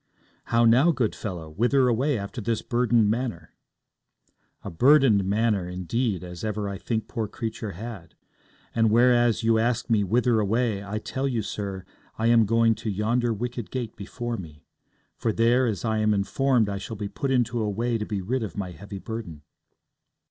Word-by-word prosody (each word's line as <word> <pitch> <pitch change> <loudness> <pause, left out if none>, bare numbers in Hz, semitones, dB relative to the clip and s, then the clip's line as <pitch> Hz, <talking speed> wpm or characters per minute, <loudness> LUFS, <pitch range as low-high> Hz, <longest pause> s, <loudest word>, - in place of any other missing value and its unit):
'How 115 0 +3
now, 125 +8 +5
good 130 -9 +1
fellow? 90 -7 -6
Whither 125 - +2
away 130 +3 +1
after 100 +4 -5
this 115 0 -1
burdened 120 -3 +2
manner?' 110 -9 -4 1.1
'A - - -6
burdened 125 - +5
manner, 100 -2 0
indeed, 95 +3 -2
as 90 -1 -8
ever 105 -1 -2
I 100 -1 -5
think 110 -2 -2
poor 110 -2 -3
creature 110 -1 -5
had. 105 -2 -9 0.6
And 115 -1 +3
whereas 120 0 +4
you 115 0 +3
ask 120 +1 0
me 105 -2 +3
whither 120 +3 +2
away, 110 0 0
I 100 +2 -4
tell 130 +5 -3
you, 120 -5 -1
sir, 100 -3 -5 0.3
I 110 - -1
am 115 -2 +5
going 115 +1 +4
to 110 - -3
yonder 115 +4 0
wicket 120 +1 -4
gate 120 -4 -4
before 120 +3 -5
me; 75 -6 -10 0.5
for 115 - 0
there, 120 +3 +3
as 110 0 -2
I 110 -1 0
am 105 -1 +2
informed, 120 +4 +1
I 100 -1 -3
shall 105 +3 -6
be 105 0 -3
put 120 +7 -3
into 120 -2 +1
a 105 - 0
way 115 +3 -1
to 105 - -3
be 100 -3 -3
rid 125 +7 -1
of 105 -2 -5
my 95 -3 -3
heavy 100 +4 -9
burden.' 95 -8 -7
110 Hz, 180 wpm, -25 LUFS, 100-120 Hz, 1.1 s, now